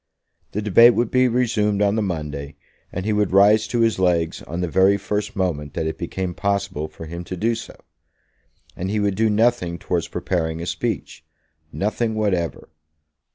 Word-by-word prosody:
The 105 - -2
debate 115 +4 +6
would 120 -1 0
be 130 0 +4
resumed 110 -4 +1
on 100 0 +2
the 110 - 0
Monday, 75 -7 -4 0.4
and 95 +1 -4
he 110 - +1
would 105 -2 +1
rise 105 +3 +5
to 120 +1 0
his 115 -4 +2
legs 85 -3 +1
on 85 +2 -6
the 90 - 0
very 95 +4 +4
first 105 +2 -3
moment 80 -7 -2
that 80 - -1
it 80 - -3
became 90 +1 -3
possible 100 -5 -2
for 80 +1 -10
him 85 +2 -6
to 90 - -6
do 115 +6 +1
so. 115 - -8 1.0
And 95 +2 -4
he 105 +1 0
would 100 -1 +1
do 110 +3 +2
nothing 105 -5 +1
towards - - -2
preparing 80 -3 -2
a 85 - -4
speech; 80 - -4 0.5
nothing 110 +4 -1
whatever. 95 -6 -1
100 Hz, 180 wpm, -22 LUFS, 85-110 Hz, 1.0 s, debate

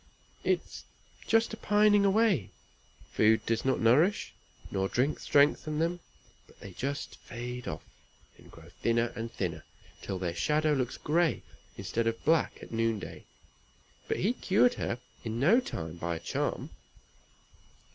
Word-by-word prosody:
"It - - +2
is - - -11 0.4
just 225 0 +3
a - - -5
pining 205 -1 +4
away. 200 - +3 0.6
Food 110 0 +3
does 115 -1 0
not 130 0 +1
nourish 150 - +3 0.4
nor 95 0 0
drink 135 +5 0
strengthen 150 +1 +3
them, 170 +2 0 0.5
but - - -21
they 100 - -9
just 140 +9 -4
fade 125 0 -7
off, - - -5 0.5
and - - -18
grow 80 0 -14
thinner 115 0 +1
and 115 0 -5
thinner, 80 -5 -3 0.4
till 95 - -4
their 90 -2 -2
shadow 150 - +1
looks 130 -4 -1
gray 165 +2 +1 0.3
instead 115 0 -1
of 115 0 -2
black 160 0 +2
at - - -11
noonday; 115 -2 -2 0.8
but - - -1
he 210 +6 +1
cured 240 +1 +3
her - - -3 0.3
in 115 0 -3
no 185 - +5
time 85 - -5
by 85 0 -2
a - - -5
charm." - - -3
125 Hz, 145 wpm, -30 LUFS, 110-170 Hz, 0.8 s, no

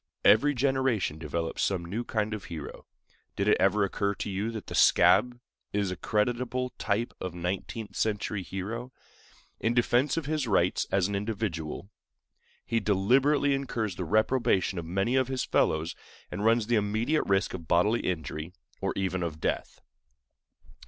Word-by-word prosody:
Every 145 +7 +5
generation 130 - +1
develops 80 +1 -3
some 90 -3 0
new 105 +8 -3
kind 110 -2 -1
of 110 - -6
hero. 80 -4 -8 0.5
Did 100 - -1
it 105 - +5
ever 100 +2 +3
occur 100 +1 -1
to 100 - -4
you 100 +4 -2
that 110 -3 -6
the - - -8
"scab" 125 -1 +5 0.3
is 100 -2 0
a - - -3
creditable 125 +5 -1
type 115 +4 -1
of 90 -2 -4
nineteenth 95 +4 -4
century 105 -1 -1
hero? 110 +7 -5 0.7
In 115 +1 0
defense 125 +4 +2
of 165 - -1
his 150 -3 -1
rights 90 -4 +2
as 95 -1 +2
an 100 - -4
individual, 100 -4 -3 0.7
he 115 - +1
deliberately 135 +9 +3
incurs 115 -8 -2
the 90 - -4
reprobation 110 0 +1
of 85 - -6
many 95 +8 0
of 130 -1 +3
his 130 -1 -2
fellows, 80 +1 +1 0.4
and 100 - -4
runs 115 0 +3
the 120 +1 +2
immediate 110 +9 0
risk 95 0 +1
of 85 -4 -7
bodily 105 +8 +3
injury, 80 -1 -4 0.3
or - - -1
even 95 -1 -1
of 80 -3 -3
death. - - -3
105 Hz, 160 wpm, -28 LUFS, 95-120 Hz, 0.7 s, Every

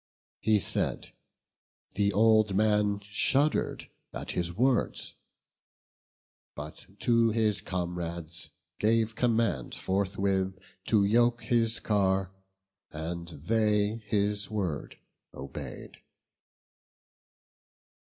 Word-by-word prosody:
He 110 -1 +3
said; - - -1 0.8
the 100 0 +2
old 110 -1 +4
man 105 -1 +2
shuddered 135 +9 +1 0.2
at - - -5
his 85 -1 -1
words: 125 +6 +1 1.4
But 75 +1 -8
to 115 -1 +4
his 110 -3 +1
comrades 85 -3 -4 0.3
gave 110 +1 +2
command 115 - 0
forthwith. 95 -1 0 0.3
To 105 -3 +3
yoke 120 +3 +3
his 115 -1 +1
car; 95 -3 +1 0.6
and 85 +2 -5
they 105 +6 +1
his 100 0 +1
word 95 -9 -3 0.4
obey'd. 65 +1 -8
100 Hz, 85 wpm, -29 LUFS, 90-110 Hz, 1.4 s, old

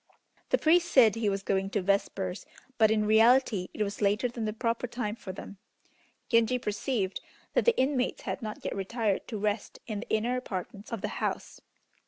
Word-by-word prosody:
The - - +4
priest 345 +2 +3
said 230 -6 +7
he 225 -2 0
was 195 0 -2
going 195 0 0
to 205 0 -1
vespers, 190 -1 -1 0.3
but 220 -1 +6
in 215 -1 +2
reality 220 -2 +4
it 215 - -1
was 200 0 -5
later 210 +4 +2
than 235 -2 -4
the 215 - -1
proper 230 +2 -1
time 225 -3 -3
for 195 - -7
them. 195 +1 -10 0.7
Genji 230 +1 +3
perceived 210 -3 -2 0.3
that - - +2
the 475 -1 +4
inmates 260 -1 0
had - - -4
not 215 -2 -6
yet - - -2
retired 200 +1 -1
to 225 - -4
rest 210 +1 -2
in 215 -3 -4
the - - -8
inner 230 +3 +1
apartments 205 -2 -6
of 230 -4 -3
the - - -1
house. - - -3
215 Hz, 190 wpm, -29 LUFS, 200-240 Hz, 0.7 s, said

